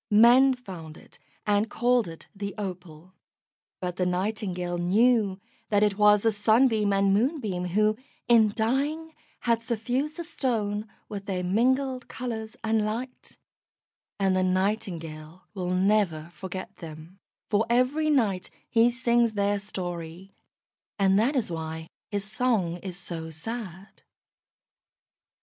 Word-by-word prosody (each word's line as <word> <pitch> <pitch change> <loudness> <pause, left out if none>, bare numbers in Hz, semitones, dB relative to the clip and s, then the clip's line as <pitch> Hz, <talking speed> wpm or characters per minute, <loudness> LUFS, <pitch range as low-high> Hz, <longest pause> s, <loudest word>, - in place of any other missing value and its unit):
Men 245 +5 +6
found 175 -10 -10
it - - -17 0.3
and 210 +1 +2
called 245 -1 +2
it 165 -1 -10
the 200 0 -5
Opal. 180 -3 -7 0.7
But 180 -1 -4
the 180 - +1
Nightingale 180 -2 -2
knew 205 +2 +3 0.3
that 205 -1 +3
it 205 -2 +2
was 210 0 +5
the 225 - +4
Sunbeam 215 0 +3
and 195 0 +3
Moonbeam 215 - 0
who, 215 +4 +2 0.3
in 225 -3 +5
dying, 290 +8 -1 0.3
had 230 -1 +1
suffused 245 +7 -2
the 340 - -4
Stone 220 -9 -2 0.2
with 200 -1 -7
their 185 -2 -2
mingled 255 +7 +1
colours 220 -3 -5
and 220 -1 +2
light; 235 +4 -5 0.8
and 190 -1 +2
the 185 - +2
Nightingale 185 -4 -2
will 185 -3 -3
never 180 -4 +1
forget 185 +4 -7
them, 165 +3 -10 0.3
for 215 +2 +2
every 255 +6 +2
night 215 -11 +1 0.2
he 230 +1 +4
sings 240 -2 +2
their 205 0 +1
story, 175 -2 -6 0.6
and 195 -1 +4
that 255 +7 +2
is 240 -9 0
why 160 0 -5 0.2
his 205 -2 -2
song 210 -5 0
is 180 0 -7
so 170 -3 -6
sad. 190 +2 -7
205 Hz, 130 wpm, -27 LUFS, 185-235 Hz, 0.8 s, Men